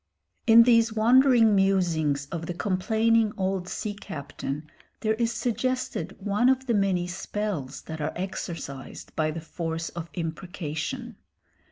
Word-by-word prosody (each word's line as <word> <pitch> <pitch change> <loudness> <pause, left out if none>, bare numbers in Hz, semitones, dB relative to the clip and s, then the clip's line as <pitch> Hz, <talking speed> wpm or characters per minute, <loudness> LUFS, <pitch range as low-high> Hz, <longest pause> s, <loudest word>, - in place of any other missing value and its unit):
In 230 0 +9
these 230 -1 +4
wandering 235 0 +5
musings 170 -7 +2
of 165 -1 -4
the 175 - -4
complaining 220 +4 +2
old 190 -1 -1
sea 210 - -3
captain 145 -5 -6 0.3
there 220 -1 +2
is 230 +1 0
suggested 250 +2 -2
one 210 +5 +2
of 265 0 +2
the 240 - +1
many 195 -4 +2
spells 180 -5 -4
that 160 -1 -6
are 150 - -1
exercised 170 -7 -6
by 155 -1 +1
the 160 +1 -4
force 165 0 -4
of 170 -1 -7
imprecation. 175 - -4
195 Hz, 135 wpm, -27 LUFS, 165-225 Hz, 0.3 s, In